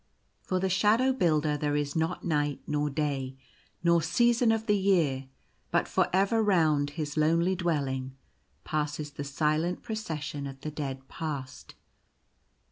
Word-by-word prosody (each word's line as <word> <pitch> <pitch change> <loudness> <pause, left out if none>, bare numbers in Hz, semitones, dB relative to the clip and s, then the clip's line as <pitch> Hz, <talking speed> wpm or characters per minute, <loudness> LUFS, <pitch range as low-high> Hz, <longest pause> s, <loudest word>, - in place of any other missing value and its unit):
For 185 - -1
the 190 - +1
Shadow 215 +7 +3
Builder 155 - +2
there 145 0 -1
is 145 -1 -1
not 165 +2 -1
night 145 -3 0
nor 150 0 0
day, 135 -3 -2 0.5
nor 170 -1 +4
season 235 +7 +3
of 225 0 0
the 210 - +3
year; 165 -10 +2 0.4
but - - +1
for - - +2
ever 195 +4 +3
round 160 -8 +3
his 150 -1 -3
lonely 165 +4 +3
dwelling 135 -7 -2 0.5
passes 150 -1 -2
the 145 - -6
silent 155 +4 0
Procession 155 - -4
of 135 0 -9
the 155 - -4
Dead 135 -3 -5
Past. 140 -5 -6
155 Hz, 140 wpm, -29 LUFS, 145-185 Hz, 0.5 s, nor